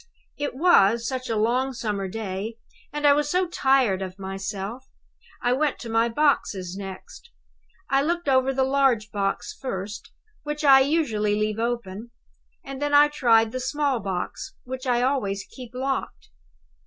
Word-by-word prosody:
"It 290 -3 -4
was, 235 - +4
such 255 -1 -4
a 225 - 0
long 245 +5 +1
summer 210 -5 -3
day, 210 +2 -5 0.3
and 295 +1 -3
I 285 - +7
was 295 0 0
so 365 +3 +2
tired 265 - +2
of 185 0 -6
myself. 195 +6 -5 0.5
I 245 - +3
went 290 +2 0
to 230 - -6
my 225 +1 +2
boxes 220 -9 0
next. 195 - -9 0.6
I 275 0 +2
looked 340 +2 -1
over 260 0 +3
the 265 0 +1
large 260 -5 +2
box 200 -1 -2
first, 205 -5 -6 0.3
which 295 0 -5
I 270 -2 +8
usually 255 -8 +1
leave 215 +1 -1
open; 230 -2 -3 0.6
and 275 0 -7
then 290 0 +1
I 295 +1 +7
tried 230 -6 +3
the 255 - -3
small 275 0 0
box, 190 -3 -5
which 260 +1 -6
I 245 -1 +2
always 205 -7 0
keep 250 -3 -12
locked. 270 +1 -3
245 Hz, 155 wpm, -24 LUFS, 210-275 Hz, 0.6 s, I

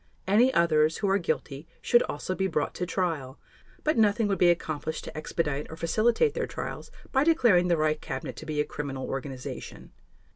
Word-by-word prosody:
Any 230 +7 +5
others 160 -5 +3
who 200 - 0
are 195 - +3
guilty 150 -3 -3
should 240 - +4
also 150 +5 -3
be 190 +1 0
brought 155 -5 -1
to 180 - -3
trial; 160 -8 -2 0.5
but 305 -6 +2
nothing 215 0 +3
would 195 -3 -1
be 175 - +6
accomplished 160 -2 -1
to - - -9
expedite 150 -2 -2
or 160 - -7
facilitate 230 - +2
their - - -2
trials - - -6 0.2
by 265 0 +3
declaring 240 - +4
the 170 -1 +2
Reich 155 0 +1
Cabinet - - -5
to - - -8
be 150 -1 -2
a 150 - +2
criminal 135 -3 -5
organization. 135 -1 -6
170 Hz, 185 wpm, -27 LUFS, 150-205 Hz, 0.5 s, be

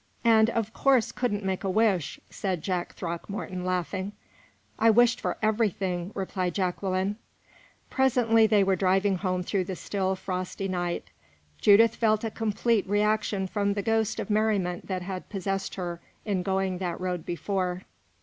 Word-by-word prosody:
"And 225 -1 +6
of 225 -2 -2
course 265 -4 +3
couldn't 205 -5 -2
make 190 0 -1
a 195 - 0
wish," 195 -5 +1
said 185 -5 -3
Jack 180 -2 -2
Throckmorton, 180 +2 -5
laughing. 185 +2 -2 0.7
"I 225 - +5
wished 240 +2 +4
for - - -2
everything," 195 -5 0
replied 185 -2 -2
Jacqueline. 190 +1 -1 0.7
Presently 235 -4 +4
they 210 -2 +4
were 195 0 +2
driving 190 +1 +2
home 185 -1 -1
through 185 0 -1
the 185 - -4
still, 190 0 -1
frosty 185 +1 -4
night. 175 - -3 0.5
Judith 220 +2 +6
felt 215 -1 +2
a 225 - -2
complete 225 -1 0
reaction 210 -1 +1
from 200 +1 0
the 200 - -2
ghost 225 0 +1
of - - -3
merriment 205 -5 0
that 185 -2 -3
had 185 0 -6
possessed 195 0 -3
her 175 -2 -4 0.2
in 200 -4 0
going 190 0 -1
that 175 -3 -3
road 180 -2 -2
before. 185 0 -2
195 Hz, 150 wpm, -27 LUFS, 185-215 Hz, 0.7 s, And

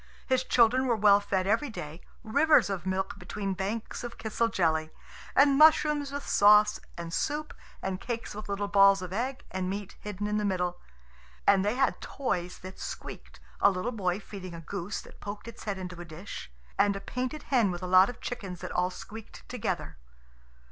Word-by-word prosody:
His 260 -1 +2
children 250 +1 +4
were 235 - +3
well 205 -1 +6
fed 195 -2 -1
every 225 +8 +1
day 155 -6 -7 0.2
rivers 285 0 +4
of 190 -1 -4
milk 190 +2 -2
between 195 -2 -3
banks 200 +6 -4
of 240 -1 -7
kisel 225 +1 0
jelly, 160 -6 +1 0.5
and 280 0 +5
mushrooms 300 -2 +5
with 285 0 -5
sauce, 210 +1 +6 0.2
and 170 -1 -6
soup, 300 - -2 0.3
and 190 0 -3
cakes 235 -1 -4
with 210 0 -8
little 200 0 -1
balls 195 -1 +5
of 180 0 -6
egg 255 +5 -3
and 185 0 -2
meat 200 0 -5
hidden 205 -1 -5
in 210 0 0
the 210 - 0
middle. 180 -3 -1 0.7
And 195 -1 +5
they 210 +3 +1
had 270 +1 +1
toys 180 -10 -3
that 185 0 -9
squeaked, - - -8 0.2
a - - +6
little 195 +5 -2
boy 190 -5 -1
feeding 185 -4 -8
a 165 - -8
goose 190 +3 -4
that - - -16
poked 205 +2 -7
its 230 - -10
head 200 -2 -2
into 180 -2 -7
a - - -5
dish, 165 - -8 0.3
and 200 0 +4
a - - -3
painted 255 +8 -4
hen 235 -6 +4
with 175 0 -5
a - - -1
lot 185 +2 +6
of 245 - -9
chickens 195 -7 -5
that 185 - -5
all 180 0 +1
squeaked 205 - -10
together. - - -3
205 Hz, 190 wpm, -29 LUFS, 185-235 Hz, 0.7 s, well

